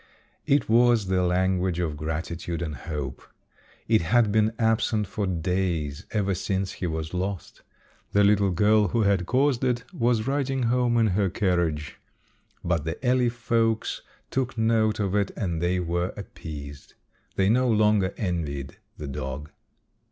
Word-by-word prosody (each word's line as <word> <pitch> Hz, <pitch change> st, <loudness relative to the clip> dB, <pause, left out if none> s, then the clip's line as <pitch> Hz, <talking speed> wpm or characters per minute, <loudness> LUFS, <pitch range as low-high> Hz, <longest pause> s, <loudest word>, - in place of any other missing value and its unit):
It 140 Hz, 0 st, +3 dB
was 115 Hz, -3 st, +4 dB
the 95 Hz, -1 st, +2 dB
language 90 Hz, 0 st, +1 dB
of 85 Hz, -4 st, -1 dB
gratitude 80 Hz, +2 st, -4 dB
and 75 Hz, -3 st, -4 dB
hope. 70 Hz, 0 st, -5 dB, 0.7 s
It 110 Hz, -3 st, +4 dB
had 110 Hz, +5 st, +3 dB
been 110 Hz, +1 st, +3 dB
absent 110 Hz, -2 st, +1 dB
for 100 Hz, +1 st, -3 dB
days 85 Hz, -3 st, -2 dB
ever 100 Hz, -3 st, 0 dB
since 95 Hz, +1 st, -2 dB
he 90 Hz, -, -4 dB
was 80 Hz, 0 st, -4 dB
lost. 95 Hz, +1 st, -4 dB, 0.5 s
The 100 Hz, -, +4 dB
little 100 Hz, -1 st, +4 dB
girl 105 Hz, +3 st, +3 dB
who 115 Hz, +4 st, +1 dB
had 100 Hz, -3 st, +1 dB
caused 130 Hz, -1 st, +2 dB
it 125 Hz, -2 st, 0 dB
was 115 Hz, -2 st, +1 dB
riding 135 Hz, -1 st, 0 dB
home 120 Hz, 0 st, +2 dB
in 115 Hz, -, +4 dB
her 95 Hz, +1 st, +1 dB
carriage, 85 Hz, -6 st, -1 dB, 0.6 s
but 85 Hz, -3 st, 0 dB
the 80 Hz, +2 st, -3 dB
alley 125 Hz, -1 st, +3 dB
folks 115 Hz, -2 st, 0 dB, 0.3 s
took 130 Hz, -2 st, -2 dB
note 110 Hz, -1 st, +2 dB
of 100 Hz, -2 st, -1 dB
it 100 Hz, -1 st, +1 dB
and 85 Hz, -7 st, -2 dB
they 90 Hz, +1 st, +1 dB
were 85 Hz, +1 st, -1 dB
appeased. 75 Hz, -8 st, -9 dB, 0.4 s
They 95 Hz, -, +2 dB
no 125 Hz, +3 st, +3 dB
longer 105 Hz, -3 st, +3 dB
envied 75 Hz, -, -3 dB, 0.2 s
the 75 Hz, -, -6 dB
dog. 70 Hz, +2 st, -5 dB
95 Hz, 150 wpm, -26 LUFS, 85-115 Hz, 0.7 s, was